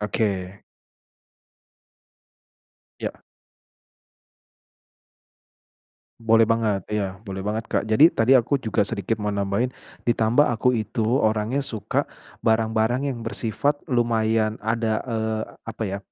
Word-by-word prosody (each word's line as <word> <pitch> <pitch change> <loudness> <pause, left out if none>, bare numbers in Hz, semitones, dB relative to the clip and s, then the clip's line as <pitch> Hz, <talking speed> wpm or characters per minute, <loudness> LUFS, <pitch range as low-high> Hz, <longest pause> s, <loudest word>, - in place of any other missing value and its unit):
Oke. 100 -3 -1 2.5
Ya. - - -5 3.0
Boleh 115 0 +4
banget. 110 -4 +1
Iya 100 -3 -3
boleh 95 0 -5
banget 110 +2 -3
Kak. - - 0
Jadi 110 +10 +6
tadi 120 -4 +2
aku 130 +2 +4
juga 110 -4 -1
sedikit 110 0 -2
mau 105 - -1
nambahin, 100 +4 0 0.4
ditambah 120 +5 +3
aku 125 +1 +2
itu 110 -1 -1 0.2
orangnya 110 +5 +1
suka 115 -6 -2 0.3
barang-barang 110 +3 +1
yang 120 - -8
bersifat 115 +5 -1
lumayan 110 -3 +1
ada, 110 -1 0
eee, 110 -2 -2 0.2
apa 115 0 -7
ya, 100 0 -3
110 Hz, 105 wpm, -24 LUFS, 105-115 Hz, 3.0 s, Jadi